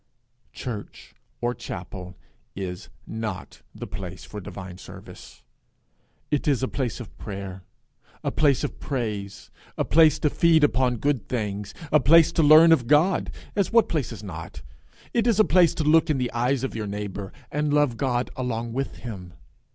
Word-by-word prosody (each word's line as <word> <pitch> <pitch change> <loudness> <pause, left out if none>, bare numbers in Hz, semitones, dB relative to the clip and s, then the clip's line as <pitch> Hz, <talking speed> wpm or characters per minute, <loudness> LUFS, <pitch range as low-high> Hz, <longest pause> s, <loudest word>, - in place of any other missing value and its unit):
Church 110 -5 -7 0.3
or 120 0 0
chapel 90 -3 -8 0.4
is 90 -2 -6 0.2
not 110 -4 -6
the - - -6
place 90 -4 -8
for 105 +7 -8
divine 95 -1 -9
service. - - -12 0.9
It 150 0 0
is 135 -3 +2
a - - +1
place 130 -4 -3
of 120 - -10
prayer, 95 -2 -6 0.6
a - - -1
place 145 -4 +2
of - - -4
praise, 105 -7 -4 0.3
a - - 0
place 155 -2 +5
to 150 - +1
feed 165 -2 +4
upon 130 -3 +2
good 140 -1 -1
things, 105 -4 -3 0.2
a 150 - +6
place 160 +4 +6
to 165 - +1
learn 155 +2 +8
of 125 -8 +4
God, 150 +7 +3 0.3
as 200 -3 +1
what 230 -1 +4
place 150 -8 -1
is 110 -3 -8
not? 80 -9 -8 0.5
It 235 0 +2
is 225 -3 +3
a 215 - +6
place 175 -3 +4
to 155 - -1
look 155 +2 +4
in 150 - +2
the 125 -2 -1
eyes 125 +2 0
of 135 - -3
your 110 -2 -3
neighbour, 100 -1 -5 0.2
and 150 0 0
love 145 -4 +3
God 125 0 -1
along 120 -2 -3
with 135 +2 -3
him. 90 -7 -7
125 Hz, 170 wpm, -25 LUFS, 100-150 Hz, 0.9 s, learn